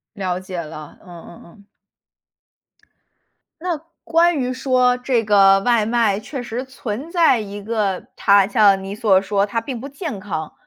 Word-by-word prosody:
了 185 -2 -3
解 185 -1 -7
了， 155 -1 -10
嗯 190 - -17 0.2
嗯 170 - -14
嗯。 200 +4 -19 2.0
那 355 -3 -1 0.3
关 335 -1 +2
于 255 -1 -1
说 255 -1 +2
这 250 -2 0
个 195 -2 +5
外 230 +1 +2
卖， 225 -3 +1
确 260 +5 -7
实 245 +2 -5
存 260 +3 -6
在 335 -9 +4
一 205 -1 -7
个 205 -3 -2
它 200 -1 +4
像 200 -2 +3
你 195 +1 -6
所 200 -3 +3
说 200 0 0
它 230 +3 -3
并 255 -2 -6
不 270 - -7
健 285 - -6
康。 160 -6 -5
215 Hz, 170 characters per minute, -20 LUFS, 195-255 Hz, 2.0 s, 个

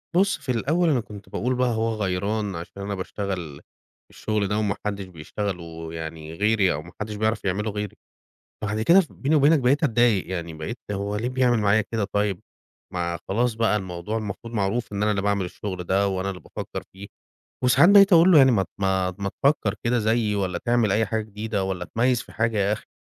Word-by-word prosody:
بُص 200 +2 +3
في 135 -3 -4
الأول، 160 +9 +1
أنا 135 - +3
كنت 105 -3 -10
باقول 125 +3 -1
بقى 125 0 +2
هو 115 0 0
غيران 100 +1 -1
عشان 85 +4 -8
أنا 100 0 -3
باشتغل 95 -6 -5 0.5
الشُغل 105 -2 -2
ده، 105 +2 -1
وما 105 -3 0
حدش 100 -2 -2
بيشتغله 85 -1 -6
يعني 80 -1 -7
غيري 100 -1 +2
أو 75 - -4
ما 85 - -13
حدش 105 0 -4
بيعرف 110 0 -1
يعملُه 105 +3 -1
غيري. 105 -1 -4 0.7
بعد 110 +1 -1
كده 175 +10 +6
ف 165 - -10
بيني 145 +3 0
وبينك 150 +1 +5
بقيت 135 +5 +2
أتضايق 120 -7 +3
يعني 85 -3 -4
بقيت 80 +10 -6
هو 100 +1 -2
ليه 120 +4 -1
بيعمل 125 -2 +2
معايا 105 +1 +3
كده 115 -2 0
طيب؟ 100 -3 0 0.5
ما 85 -1 -2
خلاص 120 +4 +1
بقى 110 -1 +1
الموضوع 95 +2 -4
المفروض 110 +2 -6
معروف، 105 +2 -1
إن 100 - -2
أنا 105 - +2
اللي 100 -2 0
باعمل 100 -2 0
الشغل 95 0 -5
ده 100 +3 +2
وأنا 95 0 -2
اللي 90 -2 -7
بافكر - - -7
فيه. 100 +1 -10 0.6
وساعات 125 +7 +6
بقيت 200 -1 +7
أقول 170 +2 +7
له 155 - +8
"يعني 135 -2 +7
مت 95 -4 +1
ما 95 -1 +1
ما 100 0 -2
تفكر 135 -8 +2
كده 120 +1 +2
زيي 110 -1 +1
والّا 95 -3 -1
تعمل 120 -4 +1
أي 110 +1 +2
حاجة 110 +2 -1
جديدة 105 -1 -3
والّا 95 -2 -3
اتميّز 120 +5 +1
في - - -16
حاجة 110 -1 0
يا 100 +1 +2
أخي، 105 - -5
105 Hz, 205 wpm, -24 LUFS, 95-115 Hz, 0.7 s, له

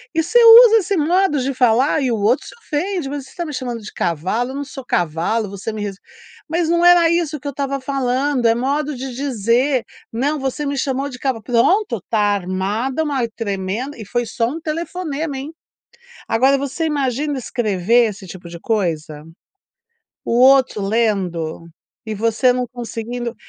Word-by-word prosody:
E 325 - +2
você 480 +9 +3
usa 455 0 +9
esse 400 -1 0
modo 340 0 +2
de 270 +2 -1
falar, 255 +4 +2
e 260 - 0
o - - +1
outro 220 +7 +1
se - - -11
ofende, 345 -4 -3
"Mas 285 -1 -5
você 270 - -16
está 345 - -5
me 305 - -6
chamando 245 -4 -4
de 210 - -9
cavalo? 185 - -2
Eu 270 - -7
não 285 - -3
sou 270 -2 -9
cavalo, 175 +5 -1
você 200 +3 -6
me 215 - -5
res 200 -2 -5 0.5
mas 330 0 0
não 340 +1 +2
era 350 -1 +6
isso 330 -3 0
que 285 - -8
eu - - -2
estava 275 0 -3
falando, 265 0 -1
é 230 - +3
modo 285 +4 -1
de 260 0 -6
dizer, 250 0 0 0.3
não 285 +6 -1
você 270 +2 -3
me 280 0 -2
chamou 270 +1 -1
de 250 -2 -10
cavalo." 250 -5 -2
Pronto, 245 - +1
tá 220 - +1
armada 205 - -1
uma 275 -6 -1
tremenda 205 +5 -3
e 215 - -7
foi 240 +4 -1
só 230 +1 -1 0.2
telefonema, 320 -3 -4
hein. 285 +4 -7 0.8
Agora 265 +5 +3
você 280 +4 -3
imagina 285 -1 -1
escrever 230 -1 +1
esse 195 -1 -11
tipo 180 -1 -10
de 170 0 -9
coisa, 160 -9 -2 1.0
o 235 - +1
outro 260 -5 +5
lendo 195 -7 -1 0.4
e 220 - -4
você 230 +4 +2
não 250 0 -1
conseguindo 240 0 -5
255 Hz, 175 wpm, -19 LUFS, 220-290 Hz, 1.0 s, usa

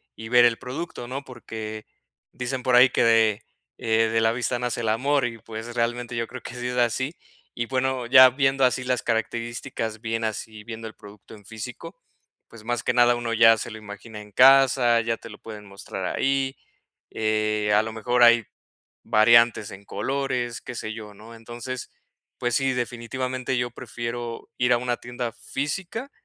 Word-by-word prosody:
y 110 0 -9
ver 120 0 +6
el 115 -1 +3
producto, 125 -2 -6
¿no?, 135 +2 -5
porque 110 -3 -8 0.5
dicen 125 +1 -4
por 125 -1 +3
ahí 125 +1 +8
que - - +1
de, 110 -2 +3 0.3
eh, 115 0 +2
de 115 0 +1
la 110 0 +3
vista 120 +1 -1
nace 125 0 -2
el 115 - -2
amor, 135 +5 +1
y 115 -1 -5
pues 110 +2 -8
realmente 120 0 -2
yo 115 0 -1
creo 130 0 -9
que 125 - -9
sí 125 0 -4
es 125 0 -3
así. 130 +5 0 0.4
Y 120 - -1
bueno, 130 -1 -1
ya 130 +1 +9
viendo 135 +1 +1
así 125 0 +1
las 125 -1 0
características, 115 0 -3
bien 115 -1 -2
así 110 0 -5
viendo 115 0 -7
el 110 - -10
producto 105 0 -15
en 105 -2 -17
físico, 115 - -8 0.5
pues 115 -2 -14
más 120 +1 -2
que - - +1
nada 120 0 +5
uno 120 -1 -3
ya 115 0 +6
se 115 - -5
lo 110 - -8
imagina 105 +1 -10
en 105 0 -14
casa, 130 -1 +6
ya 115 0 -1
te 115 - -12
lo 105 - -11
pueden 105 -2 -10
mostrar 100 -1 -7
ahí, 135 0 0 0.6
eh, 105 -1 0
a 105 - +5
lo 110 - -5
mejor 120 +2 0
hay 120 -1 +6 0.6
variantes 115 -1 +4
en 100 - -11
colores, 125 +1 -2
qué 125 - -8
sé 110 -1 -5
yo, 105 -2 -9
¿no?, 110 +3 -13
entonces, 120 +2 -7 0.5
pues 120 -1 -1
sí, 135 -1 +1
definitivamente 125 +1 -3
yo 120 0 -1
prefiero 120 -1 -6
ir 125 0 +3
a - - +4
una 120 0 -1
tienda 120 -1 -5
física, 180 - -4
120 Hz, 185 wpm, -24 LUFS, 110-125 Hz, 0.6 s, ya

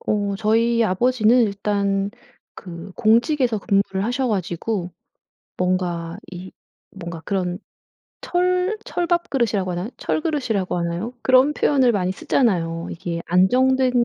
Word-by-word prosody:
어 205 -1 -1
저희 230 +2 +2
아버지는 240 +4 +3
일단 200 -1 0 0.4
그 175 0 -9
공직에서 235 +1 +2
근무를 195 -1 0
하셔가지고 210 -6 -2 0.7
뭔가 180 -2 -1
이 185 +1 -8 0.4
뭔가 170 -4 -8
그런 180 -2 -2 0.6
철 365 +3 0
철밥그릇이라고 270 - 0
하나요? 175 +4 -3
철 - - -1
그릇이라고 250 - -1
하나요? 175 +6 -3
그런 260 +3 +5
표현을 265 -5 +3
많이 185 -3 0
쓰잖아요. 170 -7 0
이게 170 0 -5
안정된 250 +7 +3
205 Hz, 280 characters per minute, -22 LUFS, 180-250 Hz, 0.7 s, 그런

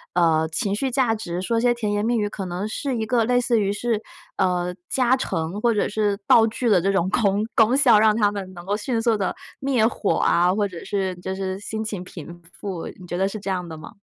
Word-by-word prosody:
呃， 160 -2 +3
情 200 +2 -1
绪 265 +4 -1
价 245 -3 +2
值， 180 -4 -4
说 230 +4 0
些 240 -1 +3
甜 210 -3 -2
言 205 0 0
蜜 235 +1 +1
语， 210 -1 0
可 195 -2 -6
能 180 +4 -3
是 255 +2 -3
一 220 - -1
个 235 0 +2
类 245 +2 +2
似 240 -1 +1
于 200 0 +1
是， 220 0 -1 0.3
呃， 180 -1 0
加 255 -1 +3
成 180 -5 -3
或 235 -1 +3
者 210 - +1
是 205 -1 0
道 225 -1 +7
具 235 +2 -2
的 195 -6 +4
这 195 +2 +1
种 185 -2 +1
功 205 -1 +1
功 235 +4 +4
效， 245 -7 +6
让 215 0 +5
它 205 -2 +2
们 190 -2 -6
能 175 0 -10
够 205 +1 0
迅 225 +2 -2
速 225 -1 +2
地 195 -2 -1 0.3
灭 260 -5 +2
火 210 - 0
啊， 180 +2 +3
或 205 0 +1
者 175 -3 -9
是 190 -2 -2
就 190 +1 -5
是 190 -1 -3
心 220 +1 -5
情 200 -4 -4
平 170 -1 -10
复。 190 -5 -6
你 180 - -11
觉 175 - -4
得 195 +1 +1
是 215 - -6
这 195 - -5
样 180 -2 -2
的 160 - -7
吗？ 155 - -11
205 Hz, 265 characters per minute, -23 LUFS, 185-230 Hz, 0.3 s, 道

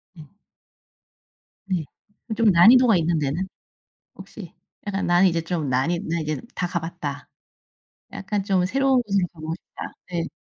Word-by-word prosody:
음. 155 -3 -12 1.4
네. 185 -4 -1 0.5
좀 230 - +3
난이도가 225 +5 +7
있는 165 -1 +1
데는? 150 +7 -2 0.7
혹시. - - -11 0.3
약간 195 -1 -2
나는 175 +2 +5
이제 165 -1 0
좀 165 -4 -3
난 130 +6 +1
이 175 - 0
'난 170 -3 -2
이제 155 0 -3
다 180 - -1
가 175 -1 -2
봤다. 150 -4 -6 0.9
약간 195 0 -3
좀 190 -3 +1
새로운 270 +3 +2
곳으로 195 -5 0
가 165 - -18
보고 160 +1 -4
싶다.' - - -10 0.2
네. 170 -2 -2
175 Hz, 255 characters per minute, -23 LUFS, 160-195 Hz, 1.4 s, 난이도가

